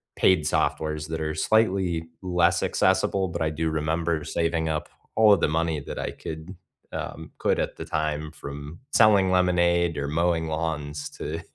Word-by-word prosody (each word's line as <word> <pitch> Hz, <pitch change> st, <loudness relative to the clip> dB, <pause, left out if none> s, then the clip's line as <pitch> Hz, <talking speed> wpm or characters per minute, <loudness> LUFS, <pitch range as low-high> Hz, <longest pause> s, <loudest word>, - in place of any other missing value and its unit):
paid 95 Hz, -4 st, +4 dB
softwares 75 Hz, 0 st, 0 dB
that 80 Hz, -1 st, -3 dB
are 80 Hz, 0 st, -2 dB
slightly 95 Hz, -3 st, +1 dB
less 90 Hz, -2 st, +2 dB
accessible, 95 Hz, -1 st, +2 dB
but 85 Hz, 0 st, -5 dB
I 80 Hz, -, +2 dB
do 80 Hz, +1 st, -1 dB
remember 80 Hz, +1 st, -1 dB
saving 80 Hz, 0 st, -1 dB
up 75 Hz, -1 st, -2 dB, 0.3 s
all 110 Hz, -2 st, +7 dB
of 100 Hz, -, +3 dB
the -, -, +2 dB
money 80 Hz, 0 st, 0 dB
that 70 Hz, -, -7 dB
I -, -, -3 dB
could, 80 Hz, +4 st, -8 dB, 0.4 s
um, 80 Hz, 0 st, -6 dB
could -, -, +1 dB
at -, -, -2 dB
the -, -, -6 dB
time 75 Hz, 0 st, -2 dB
from 75 Hz, 0 st, -8 dB
selling 100 Hz, -7 st, +5 dB
lemonade 85 Hz, -2 st, +2 dB
or 70 Hz, 0 st, -2 dB
mowing 80 Hz, +2 st, +1 dB
lawns 75 Hz, -2 st, -3 dB
to 80 Hz, +2 st, -5 dB
80 Hz, 165 wpm, -25 LUFS, 75-85 Hz, 0.4 s, all